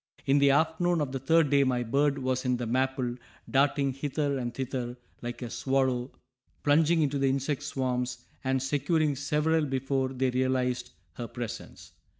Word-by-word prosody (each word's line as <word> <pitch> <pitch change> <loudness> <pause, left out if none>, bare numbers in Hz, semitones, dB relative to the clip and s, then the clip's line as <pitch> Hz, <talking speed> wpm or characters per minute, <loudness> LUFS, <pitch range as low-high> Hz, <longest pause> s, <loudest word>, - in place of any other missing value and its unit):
In 140 +1 +4
the 140 0 +5
afternoon 160 +4 +2
of 145 -3 -1
the 135 - -3
third 155 +2 +3
day 140 -1 +5
my 125 -2 +1
bird 140 +4 +1
was 130 -1 -1
in 125 -1 +1
the 120 - -3
maple, 130 0 0 0.3
darting 140 0 +2
hither 140 0 -1
and 120 -1 -3
thither 125 -1 -4 0.2
like 120 +1 -5
a 120 - -4
swallow, 130 -2 0 0.5
plunging 160 +2 +4
into 140 -1 0
the 135 0 +3
insect 135 +1 -1
swarms 125 -1 -2 0.2
and 130 -1 0
securing 145 +2 +1
several 150 +3 +1
before 135 -1 0
they 130 0 0
realized 125 -1 0 0.3
her 120 - -4
presence. 120 -1 -7
135 Hz, 160 wpm, -28 LUFS, 125-145 Hz, 0.5 s, the